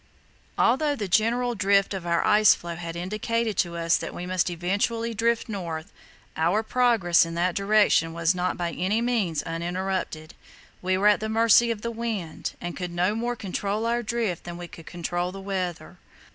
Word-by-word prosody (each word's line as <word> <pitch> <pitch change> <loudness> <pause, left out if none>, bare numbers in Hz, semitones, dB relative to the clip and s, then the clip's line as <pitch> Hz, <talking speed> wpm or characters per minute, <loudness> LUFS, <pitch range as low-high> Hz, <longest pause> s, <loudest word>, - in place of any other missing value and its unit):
Although 290 +5 +3
the 210 -7 -4
general 235 +5 +2
drift 200 -1 +2
of 185 -3 -5
our 170 0 +1
ice 215 -1 +6
floe 170 0 -7
had 170 -1 -6
indicated 215 +5 -2
to 170 -1 0
us 170 0 +2
that - - -6
we 175 - -5
must 185 0 0
eventually 205 +7 -1
drift 230 +1 0
north, 170 -7 -5 0.4
our 175 +7 +1
progress 225 -8 +3
in 165 0 -5
that 175 +1 +1
direction 200 -5 +3
was 170 +1 +1
not 180 0 -1
by 175 -1 -2
any 190 +6 0
means 215 -11 0
uninterrupted. 170 -1 -3 0.5
We 185 +1 +1
were 195 - 0
at 210 - +3
the 220 - -3
mercy 230 +1 +5
of 225 -2 -3
the 235 - -2
wind, 220 -8 -4
and 175 -1 -5
could 180 -1 -4
no 175 +4 0
more 240 +2 -2
control 205 +1 -3
our 235 +1 +1
drift 220 -6 -2
than 175 0 -7
we 175 0 -7
could 165 -1 -13
control 175 +1 -3
the 195 - -8
weather. 185 -3 -4
190 Hz, 185 wpm, -25 LUFS, 175-225 Hz, 0.5 s, ice